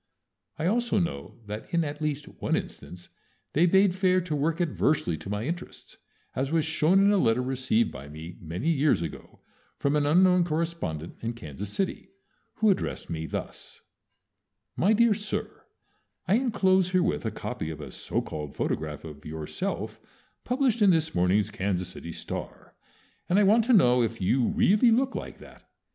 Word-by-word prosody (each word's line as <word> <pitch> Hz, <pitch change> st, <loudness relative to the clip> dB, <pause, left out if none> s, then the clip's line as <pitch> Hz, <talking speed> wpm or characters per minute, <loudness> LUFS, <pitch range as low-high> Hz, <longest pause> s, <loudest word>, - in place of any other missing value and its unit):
I 160 Hz, -, -2 dB
also 235 Hz, +3 st, +1 dB
know 170 Hz, -3 st, -2 dB
that 105 Hz, +1 st, -7 dB
in 170 Hz, -1 st, +2 dB
at 145 Hz, 0 st, -5 dB
least 150 Hz, -1 st, -2 dB
one -, -, -2 dB
instance 90 Hz, 0 st, -7 dB, 0.4 s
they 170 Hz, +4 st, +4 dB
bade 190 Hz, +1 st, +4 dB
fair 185 Hz, 0 st, +3 dB
to 170 Hz, -3 st, -3 dB
work 155 Hz, +4 st, 0 dB
adversely 155 Hz, -, +1 dB
to 95 Hz, -, -9 dB
my 105 Hz, +2 st, -2 dB
interests, 170 Hz, +4 st, -7 dB, 0.4 s
as 135 Hz, +2 st, -1 dB
was 160 Hz, -2 st, +2 dB
shown 160 Hz, +3 st, +3 dB
in 200 Hz, -, +5 dB
a 205 Hz, -, +3 dB
letter 115 Hz, -4 st, +2 dB
received 130 Hz, -3 st, 0 dB
by 70 Hz, -, -9 dB
me 80 Hz, +3 st, -9 dB
many 85 Hz, -, -2 dB
years 145 Hz, -, +2 dB
ago 80 Hz, -, -9 dB, 0.4 s
from 140 Hz, +1 st, +1 dB
an 145 Hz, -1 st, +2 dB
unknown 180 Hz, +3 st, +5 dB
correspondent 155 Hz, -, -3 dB
in 115 Hz, +1 st, -2 dB
Kansas 95 Hz, -2 st, -7 dB
City, 195 Hz, -, -3 dB, 0.5 s
who 215 Hz, -1 st, +4 dB
addressed 190 Hz, -, -3 dB
me 80 Hz, -1 st, -3 dB
thus: -, -, -7 dB, 0.9 s
MY 200 Hz, +5 st, +3 dB
DEAR 235 Hz, 0 st, +4 dB
SIR, 210 Hz, +1 st, -5 dB, 0.6 s
I -, -, +3 dB
inclose 195 Hz, -6 st, +3 dB
herewith 180 Hz, -, +1 dB
a -, -, -1 dB
copy 80 Hz, -, -5 dB
of 80 Hz, -, -6 dB
a -, -, -8 dB
so -, -, -3 dB
called 75 Hz, -2 st, -6 dB
photograph 75 Hz, +1 st, -3 dB
of 75 Hz, -2 st, -10 dB
yourself 80 Hz, 0 st, -4 dB, 0.4 s
published 250 Hz, -2 st, +1 dB
in 205 Hz, -, +6 dB
this 160 Hz, -3 st, +2 dB
morning's 95 Hz, +4 st, +2 dB
Kansas 95 Hz, -3 st, -2 dB
City 85 Hz, -, -8 dB
"Star," -, -, -7 dB, 0.6 s
and 180 Hz, -, +3 dB
I 210 Hz, -, +5 dB
want 215 Hz, +3 st, +4 dB
to 255 Hz, -, +2 dB
know 125 Hz, -, +5 dB
if 115 Hz, 0 st, -1 dB
you 120 Hz, +6 st, +2 dB
really 210 Hz, +5 st, +4 dB
look 260 Hz, +4 st, +2 dB
like -, -, -6 dB
that. -, -, -16 dB
150 Hz, 170 wpm, -27 LUFS, -, 0.9 s, in